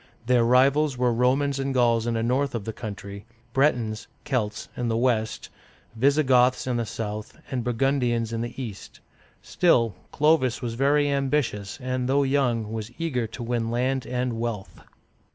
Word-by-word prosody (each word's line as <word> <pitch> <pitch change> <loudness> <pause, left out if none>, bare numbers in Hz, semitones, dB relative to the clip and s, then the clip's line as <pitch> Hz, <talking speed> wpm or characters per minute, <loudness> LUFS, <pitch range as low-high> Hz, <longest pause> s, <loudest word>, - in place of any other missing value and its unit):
Their 125 -1 +3
rivals 135 +4 +3
were 125 -1 +2
Romans 135 +4 +1
and 135 0 -2
Gauls 120 -2 +3
in 115 - 0
the 115 - 0
north 130 +3 0
of 110 -4 -4
the 110 - -4
country, 100 -2 -8 0.3
Bret'ons 120 -6 +1 0.2
(Celts) 110 -6 -2
in 120 - -2
the 115 -1 0
west, 115 -3 0 0.5
Visi 140 +6 +3
goths 130 -1 +3
in 125 -2 -1
the 115 -2 -2
south, 105 0 -5
and 125 -3 -1
Burgundians 120 -2 0
in 115 - -2
the 120 +3 -6
east. 110 -7 -8 0.4
Still, 115 - +2 0.2
Clovis 150 -5 +2
was 120 -3 -4
very 145 +4 +2
ambitious, 135 -7 -1
and 130 -1 -2
though 140 +1 +3
young, 125 -6 0
was 110 -1 -4
eager 130 -9 -1
to 120 +2 -8
win 115 -1 -1
land 125 +2 -1
and 125 -2 -2
wealth. 115 -4 -4
125 Hz, 165 wpm, -25 LUFS, 115-135 Hz, 0.5 s, Their